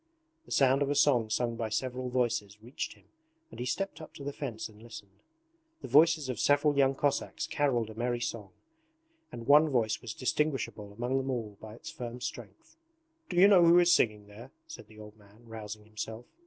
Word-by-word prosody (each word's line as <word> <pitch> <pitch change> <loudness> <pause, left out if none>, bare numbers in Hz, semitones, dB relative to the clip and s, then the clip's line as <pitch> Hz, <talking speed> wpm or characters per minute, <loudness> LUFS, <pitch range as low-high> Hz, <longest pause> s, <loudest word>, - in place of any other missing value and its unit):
The - - -15
sound 135 0 +3
of 140 - +1
a 145 - 0
song 120 -7 +3
sung 120 +2 -1
by 115 -1 -3
several 125 +2 -3
voices 120 -5 -1
reached 120 +5 -6
him - - -23 0.5
and - - -11
he 125 - -3
stepped 195 +3 -3
up 155 - -12
to 140 - -9
the 145 0 -4
fence 120 -7 -5
and 110 -1 -18
listened. 100 -4 -12 0.6
The - - -5
voices 155 -1 +4
of 125 -4 -4
several 145 +1 +3
young 135 -1 +3
Cossacks 145 +1 -1
carolled 120 -7 0
a - - -9
merry 120 +2 -2
song, 115 -4 -4 0.8
and 115 - -8
one 150 +3 +6
voice 115 -5 0
was 115 -3 -7
distinguishable 130 -7 -2
among 120 +5 -2
them 135 0 -2
all 115 -5 -3
by 110 0 -10
its - - -9
firm 120 -1 -7
strength. 110 - -8 0.5
'Do 175 - -4
you 190 +3 +8
know 190 -4 +6
who 170 +1 +7
is 175 0 +5
singing 105 -2 +2
there?' 105 +5 -12 0.2
said 105 - -11
the 110 0 -17
old 105 0 -12
man, 105 +3 -21
rousing 105 -1 -8
himself. 110 +2 -7
120 Hz, 200 wpm, -30 LUFS, 110-140 Hz, 0.8 s, you